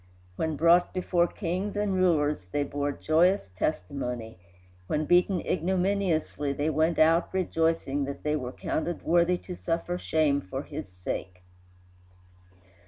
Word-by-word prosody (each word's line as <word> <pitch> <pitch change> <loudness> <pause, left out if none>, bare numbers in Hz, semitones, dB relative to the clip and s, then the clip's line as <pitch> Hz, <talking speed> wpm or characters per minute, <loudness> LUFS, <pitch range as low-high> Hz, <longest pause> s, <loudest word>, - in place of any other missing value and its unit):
When 160 - -1
brought 170 +4 +4
before 175 -1 +2
kings 185 +3 -3
and 205 -1 0
rulers 150 - +1
they 145 - +1
bore 145 0 -2
joyous 160 - +2
testimony; 125 -4 -3 0.5
when 155 +6 0
beaten 175 +2 +3
ignominiously 180 -5 0
they 145 +3 0
went 160 +3 +1
out 165 +2 +4
rejoicing 165 -6 0
that 140 0 -7
they 150 0 +1
were 125 -4 -3
counted 165 +5 -3
worthy 175 +1 +3
to 180 - -8
suffer 175 +1 -2
shame 150 -5 +1
for 95 - -5
his - - -7
sake. 90 0 -6
160 Hz, 130 wpm, -28 LUFS, 145-175 Hz, 0.5 s, brought